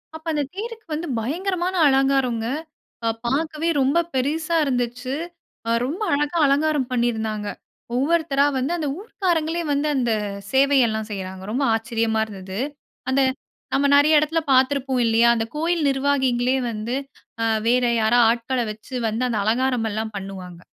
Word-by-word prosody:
அப்ப 320 - -10
அந்த 295 -1 0
தேருக்கு 450 +2 -6
வந்து 325 +3 -3
பயங்கரமான 360 - -2
அலங்காரம்ங்க. 270 -4 +2 0.6
அ - - +2 0.2
பார்க்கவே 310 +5 -1
ரொம்ப 275 +6 +3
பெருசா 310 +5 0
இருந்துச்சு. 250 0 -2 0.6
அ - - +2
ரொம்ப 340 - -3
அழகாக 295 +3 +1
அலங்காரம் 285 -1 +1
பண்ணியிருந்தாங்க. 220 -4 -1 0.5
ஒவ்வொருத்தரா 285 0 +2
வந்து 265 +5 -1
அந்த 310 -3 -2
ஊர்க்காரங்களே! 345 -6 -1
வந்து 290 +2 0
அந்த 240 -3 +1 0.4
சேவையெல்லாம் 255 -6 +3
செய்றாங்க, 190 -1 -6
ரொம்ப 265 +4 0
ஆச்சரியமா 225 -1 0
இருந்தது. 190 -1 -7 0.5
அந்த 275 +1 +3 0.5
நம்ம 280 +1 +3
நிறைய 300 +2 +5
இடத்துல 310 +2 +1
பார்த்துருப்போம் 260 -1 +2
இல்லயா! 230 +1 +4
அந்த 225 -1 -1
கோயில் 330 +1 0
நிர்வாகிங்களே 265 -2 +1 0.2
வந்து 225 +3 -3 0.5
அ - - +2 0.2
வேற 245 +1 +3 0.2
யாரா 220 +3 +3
ஆட்கள 240 +2 -2
வச்சு 220 +5 -10
வந்து 225 +4 -2
அந்த 220 - 0
அலங்காரம் 245 0 +1
எல்லாம் 220 0 -4
பண்ணுவாங்க. 185 -3 -8
265 Hz, 135 wpm, -22 LUFS, 230-300 Hz, 0.6 s, நிறைய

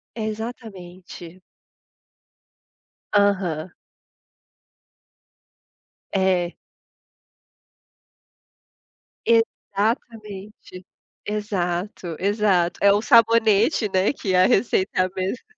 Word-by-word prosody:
Exatamente. 195 -6 -8 1.7
Aham. 190 -5 +1 2.4
É. 185 -2 +1 2.7
Exatamente, 215 -4 -2 0.4
exato, 185 -4 -3
exato. 195 -4 +1
É 200 - +6
o 205 +1 +1
sabonete, 230 0 +4
né, 190 +6 +2
que 190 -9 -3
a 185 +1 +5
receita 195 -5 +1
é 185 - +3
a 185 - 0
mesma. 190 +6 -4
200 Hz, 60 wpm, -22 LUFS, 185-220 Hz, 2.7 s, É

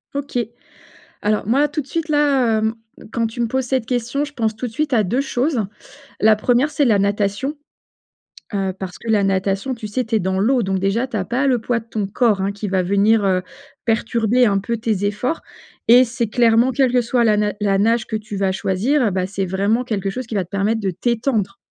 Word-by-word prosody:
OK, 280 -3 -2 0.8
alors 210 -1 0
moi 275 +6 +3
tout 300 +1 -3
de 270 - -14
suite, 330 +3 -3
là, 275 -7 +3
hem, 220 +1 0 0.4
quand 230 - 0
tu 225 +2 -4
me 235 - +1
poses 260 +2 -1
cette 255 -3 -1
question, 245 +3 -1
je 295 0 -7
pense 225 -5 -1
tout 245 +3 -4
de - - -9
suite 290 +4 -2
à 220 -3 +4
2 235 +8 0
choses. 265 -2 0 0.6
La 215 0 +5
1re 245 +6 +2
c'est 295 -2 +1
la 215 -4 +4
natation, 205 +7 0 1.0
heu, 195 -1 0
parce 190 -2 -7
que 230 - -7
la 210 -2 +3
natation, 195 +5 0
tu 225 -3 -6
sais, 245 +4 -2
tu 225 +1 -1
es - - +3
dans 190 0 -1
l'eau 245 +5 +3
donc 190 -2 -1
déjà 195 +7 0
tu 235 - -4
as 190 - -2
pas 255 +7 0
le 255 -2 +3
poids 235 +1 -1
de 225 - -15
ton 215 -3 -2
corps, 210 0 +1
hein, 195 +1 0
qui 205 +1 -5
va 190 -1 +1
venir, 200 +3 +3
heu, 185 -1 +2 0.4
perturber 230 +1 +2
un 200 -3 +2
peu 230 +4 -3
tes 215 -3 -1
efforts 210 +10 -1 0.5
et 245 +2 +8
c'est 235 -1 -2
clairement 235 +2 +3
quelle 255 -1 +2
que 250 - +4
soit 240 +1 +1
la 215 -2 +4
na 210 -1 0
la 200 -2 +1
nage 225 +2 +2
que 220 - -4
tu 215 -1 -5
vas 195 -1 +1
choisir, 210 +7 +1
bah, 185 0 -1
c'est 195 0 -3
vraiment 200 +6 +1
quelque 205 -5 -2
chose 255 +3 -5
qui 225 - -5
va 190 -3 0
te 170 - -32
permettre 210 +3 0
de 195 -2 -1
t'étendre 225 -1 -1
225 Hz, 230 wpm, -20 LUFS, 200-250 Hz, 1.0 s, et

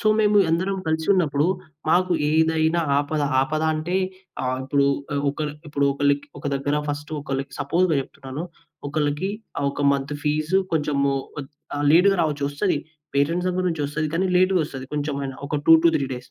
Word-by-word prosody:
So, 215 - -3
మేము 210 -1 +3
ఎందరం 185 +4 0
కలిసున్నప్పుడు, 160 -2 +2 0.4
మాకు 180 +1 +3 0.2
ఏదైనా 160 +1 +2 0.2
ఆపద, 145 +1 -1 0.2
ఆపద 155 +4 -1
అంటే, 170 +4 -2 0.5
ఆహ్, 130 0 -1
ఇప్పుడు 140 +1 +2 0.3
ఆహ్, 140 - -1
ఒకళ్ళు 150 0 -4 0.2
ఇప్పుడు 145 -1 0
ఒకళ్ళకి 140 0 +1
ఒక - - -14
దగ్గర 145 +2 0
ఫస్ట్ 145 +1 -4
ఒకళ్ళకి 135 -1 -4
సపోజ్‌గా 165 +3 +2
చెప్తున్నాను. 135 +3 -7 0.4
ఒకళ్ళకి 150 +5 -1 0.3
ఆహ్, 140 - 0
ఒక 145 - -4
మంత్ 140 +1 -2
ఫీజు 155 +5 +1 0.2
కొంచెము 140 -2 +1 0.3
ఒద్ 135 - -9 0.3
ఆహ్, 145 0 0
లేట్‌గా 195 +4 +5
రావచ్చు. 145 -2 -1
వస్తది. 145 0 0 0.4
పేటెంట్స్ 170 +6 +1
సంబంధించి 180 -4 -1
వస్తది. 150 +1 -2
కానీ, 185 +2 +1
లేట్‌గ 185 0 +3
వస్తది 135 -3 -7
కొంచెమైనా. 140 -2 -3
ఒక 145 0 -1
2-3 165 -3 +6
డేస్. 125 0 -10
150 Hz, 155 wpm, -23 LUFS, 140-165 Hz, 0.5 s, 2-3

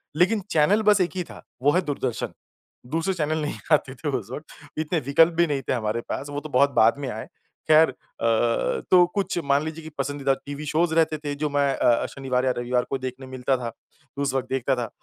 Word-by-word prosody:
लेकिन 185 +7 +3
चैनल 175 +8 +4
बस 205 -2 +5
एक 180 - +1
ही 180 - -1
था, - - -12 0.2
वो 145 +2 +4
है 180 - +2
दूरदर्शन। 135 -5 -3 0.6
दूसरे 165 +4 0
चैनल 155 -3 -1
नहीं 150 - -3 0.2
आते 135 -3 +2
थे 150 - -4
उस 110 -3 -8
वक़्त, 150 +4 -6 0.3
इतने 160 +2 0
विकल्प 160 +5 +4
भी 170 +1 +3
नहीं 145 -3 -1
थे - - +3
हमारे 115 -1 -1
पास, 145 - -4
वो 145 0 -3
तो 155 +1 -9
बहुत 140 +1 +4
बाद 115 -2 +4
में 140 - -4
आए। 110 -1 -6 0.4
ख़ैर 155 0 +7
अ, 130 - -8 1.0
तो 180 -1 +8
कुछ 195 -3 -1
मान 140 +1 +2
लीजिए 160 +1 -6
की 160 - -8
पसंदीदा 140 0 0
टीवी 145 +1 -6
शोज़ 160 +3 +1
रहते 160 -1 +3
थे 145 -1 -4
जो 150 +1 -2
मैं 140 -1 +2
अ, 120 -2 +3
शनिवार 130 -2 -2
या 130 - +3
रविवार 125 0 0
को 135 - -1
देखने 130 0 -6
मिलता 130 +1 -1
था, 120 -2 -4 0.5
उस 140 -2 0
वक़्त 130 -1 -1
देखता 135 0 0
था। 120 -3 -3
145 Hz, 220 wpm, -24 LUFS, 130-160 Hz, 1.0 s, तो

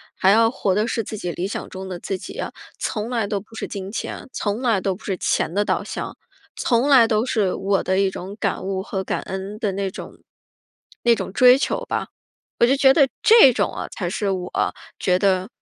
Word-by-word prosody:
还 190 - +4
要 225 +1 +5
活 195 -5 -1
的 210 +4 +1
是 230 -1 -1
自 215 - -6
己 175 -3 -3
理 180 - -3
想 200 - -5
中 190 0 -7
的 175 -2 -5
自 195 - -3
己 - - -9
呀， - - -4 0.3
从 215 +1 -3
来 225 -4 0
都 200 -1 -1
不 220 +2 -21
是 - - -5
金 195 -1 -6
钱， 230 - -5
从 205 +3 -2
来 230 -6 +2
都 190 -1 -1
不 210 - -16
是 195 - -2
钱 165 - 0
的 205 +1 +2
导 - - 0
向， - - -6 0.4
从 245 +2 +1
来 260 -5 +7
都 215 0 +1
是 210 -7 +1
我 195 0 0
的 190 +1 +1
一 195 -1 +3
种 190 +2 -7
感 200 -2 -1
悟 190 0 -2
和 190 -1 -4
感 - - -2
恩 195 +3 -6
的 200 -3 -1
那 195 -1 -2
种 - - -9 0.9
那 235 -1 +5
种 205 - -3
追 250 +3 +7
求 - - -1
吧。 - - -2 0.5
我 235 - +6
就 265 - +3
觉 270 -1 +6
得 280 -3 +5
这 445 - +8
种 - - 0
呃 - - -4
才 180 -5 -4
是 200 +2 -2
我 180 -1 -3 0.5
觉 180 -1 +2
得 190 +1 +1
200 Hz, 240 characters per minute, -22 LUFS, 190-230 Hz, 0.9 s, 这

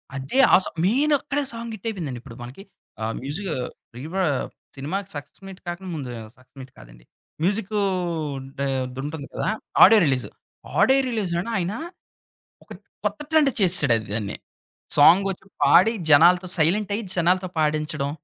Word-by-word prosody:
అదే 135 - -2
ఆ - - +10
సా - - -4 0.2
మెయినక్కడే 285 +4 +1
సాంగ్ 230 0 -6
హిట్టయిపోయిందండి. 180 - -5
ఇప్పుడు 125 -4 -12
మనకి 130 +11 -10 0.4
ఆ - - 0 0.2
మ్యూజిక్ 165 +8 -4 0.5
రీ‌ 125 - -8
వా 190 - +1 0.5
సినిమాకి 185 +9 -4
సక్సెస్ 145 +6 -9
మీట్ 190 -1 -10
కాకుండా 175 +2 -6
ముందు 135 -5 -6 0.3
సక్సెస్ 130 +2 -25
మీట్ 130 0 -12
కాదండి. - - -16 0.4
మ్యూజిక్కూ 205 +2 0 0.8
డా 140 - -1 0.2
అదుంటుండి 140 +3 -6
గదా! - - -2 0.3
Audio 225 -2 +8
release. 130 -3 0 0.5
ఆడియో 270 +1 +5
రిలీజ్‌‌లోనే 195 -3 -2
ఆయన 180 +3 -2 0.9
ఒక - - -29 0.4
కొత్త - - -1
ట్రెండ్ 310 -3 +4
చేసేసాడు 170 - +4
అది 110 - -8
దాన్ని. 105 -3 -3 0.6
సాంగొచ్చి 190 +6 +4 0.2
పాడి 180 +11 +5 0.2
జనాలతో 175 +5 +6
సైలెంటయ్యి 205 +7 0
జనాలతో 180 +1 +1
పాడించడం 150 -2 -1
175 Hz, 135 wpm, -23 LUFS, 140-205 Hz, 0.9 s, ఆ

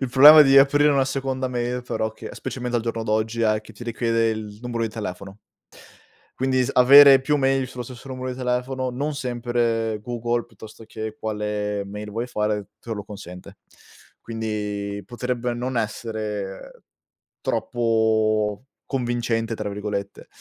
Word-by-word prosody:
Il 135 - -1
problema 145 +5 +9
di 135 -1 +6
aprire 145 +2 +5
una 135 -2 +3
seconda 130 -1 -2
mail 125 0 -2
però 110 -2 -2
che, - - -9
specialmente 125 -2 -4
al 115 - -1
giorno 115 -1 -3
d'oggi, 110 +2 0
è 110 -1 +2
che 110 - -15
ti 115 +3 -10
richiede 115 -1 0
il 105 -2 -6
numero 120 -1 -3
di 115 - 0
telefono. 100 -2 -7 1.0
Quindi 130 -1 +1
s - - -2
avere 135 +1 +9
più 150 +2 +1
mail 135 -1 +1
sullo 125 -1 -7
stesso 125 +2 -11
numero 130 0 -5
di 125 - -6
telefono 130 +1 -2
non 145 +4 -3
sempre 120 -4 -1
Google 120 0 -2
piuttosto 110 0 -13
che 110 0 -7
quale 105 -1 -2
mail 105 +1 -7
vuole 115 +4 -3
fare, 105 -3 -2
te 115 - -6
lo 105 -2 -5
consente. 90 -3 -11 0.6
Quindi, 105 -3 -4
potrebbe 125 +1 -3
non 125 +1 -3
essere 105 -3 -4 0.6
troppo 110 -2 +1 0.2
"convincente" 120 -3 -1
tra 105 -1 -4
virgolette. 100 -1 -5
115 Hz, 150 wpm, -23 LUFS, 105-125 Hz, 1.0 s, problema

